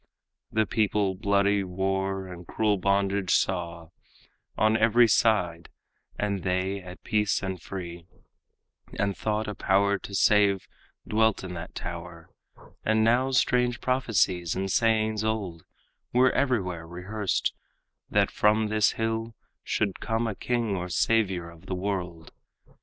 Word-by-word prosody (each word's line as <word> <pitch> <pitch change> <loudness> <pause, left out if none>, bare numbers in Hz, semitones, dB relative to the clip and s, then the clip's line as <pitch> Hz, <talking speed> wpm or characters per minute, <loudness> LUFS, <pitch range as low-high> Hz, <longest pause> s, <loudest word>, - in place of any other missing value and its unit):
The 110 0 +2
people 105 -3 +1
bloody 100 0 +2
war 95 +1 -2
and 90 -2 -10
cruel 105 -3 +1
bondage 100 0 +1
saw 85 -3 -1 0.7
On 110 +1 +3
every 115 +2 +5
side, 90 -7 +2 0.5
and 100 -2 -1
they 95 +2 -1
at 90 0 -11
peace 105 -1 +1
and 95 -3 -4
free, 85 -2 -7 0.9
And 100 -1 0
thought 110 0 -2
a 105 - -3
power 100 +1 +2
to 100 - -7
save 100 -2 +3 0.4
dwelt 110 -1 +2
in 90 -1 -6
that 85 0 -8
tower. 85 -1 -7 0.5
And 110 0 +2
now 120 +4 +3
strange 125 -2 +2
prophecies 105 -9 +1
and 95 0 -2
sayings 110 -2 +2
old 100 -7 -3 0.5
Were 125 +1 +4
everywhere 95 -11 -1
rehearsed, 95 +4 -2 0.6
that - - +2
from 105 +1 +2
this 110 -1 +3
hill 115 0 -2 0.3
Should 100 -3 -1
come 115 +1 -1
a 110 - -1
king 115 -1 -1
or 90 -1 -4
savior 95 -4 +1
of 85 +2 -17
the 95 - -2
world. 90 -4 -4
100 Hz, 130 wpm, -27 LUFS, 90-110 Hz, 0.9 s, every